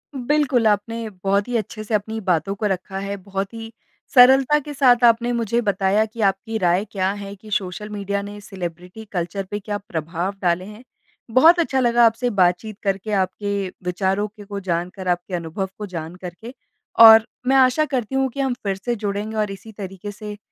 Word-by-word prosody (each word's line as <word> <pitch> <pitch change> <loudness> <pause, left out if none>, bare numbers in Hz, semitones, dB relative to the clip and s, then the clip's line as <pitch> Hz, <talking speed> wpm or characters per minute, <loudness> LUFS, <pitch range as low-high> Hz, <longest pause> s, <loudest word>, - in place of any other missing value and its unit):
बिल्कुल। 260 -3 +1
आपने 220 +2 -1
बहुत 200 +3 +1
ही 245 - -3
अच्छे 215 0 -5
से 215 - -6
अपनी 220 +2 -1
बातों 180 +2 +1
को 210 - -3
रखा 190 -1 -2
है। 200 0 -4
बहुत 195 +1 -4
ही 225 0 -8 0.4
सरलता 265 +3 +6
के 295 +1 -8
साथ 250 -3 +4
आपने 235 +1 +4
मुझे 235 0 0
बताया 200 +1 +1
कि 220 +1 -8
आपकी 200 +3 0
राय 180 +1 +2
क्या 190 -1 0
है, 200 0 -8
कि 215 +2 -15
सोशल 200 +1 -3
मीडिया 200 -1 -3
ने 205 +1 -8
सेलिब्रिटी 180 +1 -8
कल्चर 180 +1 -3
पे 205 - -2
क्या 205 0 -4
प्रभाव 175 0 -4
डाले 180 0 +1
हैं। 210 +4 -12 0.5
बहुत 320 +9 +6
अच्छा 270 -5 +1
लगा 240 -1 +4
आपसे 230 +2 +2
बातचीत 195 +1 +1
करके, 195 +2 -2
आपके 200 +1 -1 0.2
विचारों 190 +3 0
के 210 0 -14
को 200 0 -5
जानकर, 180 +1 -3
आपके 180 +1 -1
अनुभव 175 +3 -4
को 210 - -5
जानकर 175 0 -7
के। 235 +3 -8 0.5
और 220 0 +9 0.2
मैं 270 - +4
आशा 260 +3 +4
करती 260 -3 -3
हूँ 265 0 +2
कि 275 - -9
हम 265 -2 +1
फिर 195 -2 -1
से 240 -1 0
जुड़ेंगे 210 +1 -3
और 210 -2 0
इसी 220 +3 -10
तरीके 195 0 -7
से 210 0 -8
205 Hz, 190 wpm, -21 LUFS, 190-230 Hz, 0.5 s, और